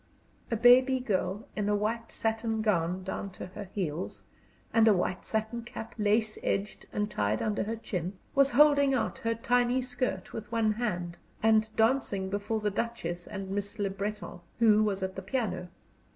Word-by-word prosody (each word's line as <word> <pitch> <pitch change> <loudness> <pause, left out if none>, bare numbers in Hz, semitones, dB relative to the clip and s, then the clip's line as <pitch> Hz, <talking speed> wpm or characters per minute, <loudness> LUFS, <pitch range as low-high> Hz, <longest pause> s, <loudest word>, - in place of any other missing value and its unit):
A 230 - 0
baby 255 +3 +6
girl 205 -1 -1
in 210 -1 0
a 210 - +3
white 225 +3 -2
satin 225 0 -1
gown 180 -3 +1
down 190 +1 -4
to - - -7
her 195 +3 -8
heels, 180 -4 -4 0.5
and 225 0 +5
a 215 - +6
white 180 0 -2
satin 220 +2 -1
cap, 230 0 -8
lace 215 0 +1
edged 200 +1 -2
and 210 0 -1
tied 105 - 0
under 210 -1 0
her 225 +2 -2
chin, 185 -5 -4 0.2
was 275 -2 +4
holding 285 0 +5
out 235 - -1
her 230 0 0
tiny 245 +2 +2
skirt 245 -6 -3
with 225 0 -7
one 225 -2 +2
hand 180 -7 -3 0.3
and 220 -1 +4
dancing 220 -5 +1
before 205 +2 -1
the 210 0 0
Duchess 175 -6 -3
and 195 -1 -6
Miss 200 +2 -3
Le 200 -2 -1
Breton, 205 -1 -5 0.2
who 215 -2 +5
was 200 -2 -1
at 190 0 -3
the 190 - -5
piano. 190 -4 -2
215 Hz, 175 wpm, -29 LUFS, 195-230 Hz, 0.5 s, baby